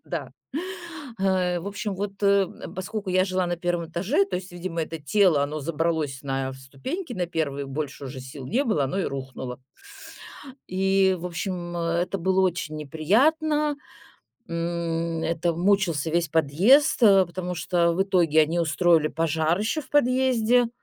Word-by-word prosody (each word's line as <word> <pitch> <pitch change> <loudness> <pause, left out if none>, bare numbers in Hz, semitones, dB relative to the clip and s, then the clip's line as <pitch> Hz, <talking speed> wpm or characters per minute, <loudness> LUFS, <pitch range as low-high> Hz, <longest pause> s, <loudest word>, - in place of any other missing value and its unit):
Да, - - -5 0.9
в 185 -2 0
общем, 205 0 -4
вот, 200 0 -3
э, 200 -2 +4 0.3
поскольку 190 +1 -4
я 185 0 +3
жила 185 -1 0
на 175 0 -2
1 175 -1 -2
этаже, 195 +4 +1
то 185 - -2
есть, 180 0 -8
видимо, 170 -2 -3
это 165 +1 -5
тело, 155 -1 +3
оно 150 +1 -3
забралось 155 -3 -1
на 135 -1 -2
ступеньки 145 - -6
на 180 -4 -2
1, 140 -4 -2
больше 140 0 -5
уже 130 0 -7
сил 130 0 -9
не 255 - +1
было, 155 - +1
оно 160 +9 -2
и - - -1
рухнуло. 130 -2 -5 1.1
И, 190 0 +2
в 180 - -5
общем, 175 0 -4
э, 170 0 0
это 195 +2 -3
было 190 +2 +2
очень 175 -4 -1
неприятно. 290 - +1 0.7
М, 170 -1 -2
это 165 +1 0
мучился 175 -4 +1
весь 170 0 +1
подъезд, 175 - +4
э, 195 -3 +7
потому 180 +1 -5
что 170 -1 +1
в 190 - +2
итоге 170 -5 +3
они 165 +3 0
устроили 165 -1 +3
пожар 160 +2 0
ещё 225 +9 -1
в 260 - -17
подъезде. 250 -3 +3
175 Hz, 155 wpm, -25 LUFS, 160-195 Hz, 1.1 s, э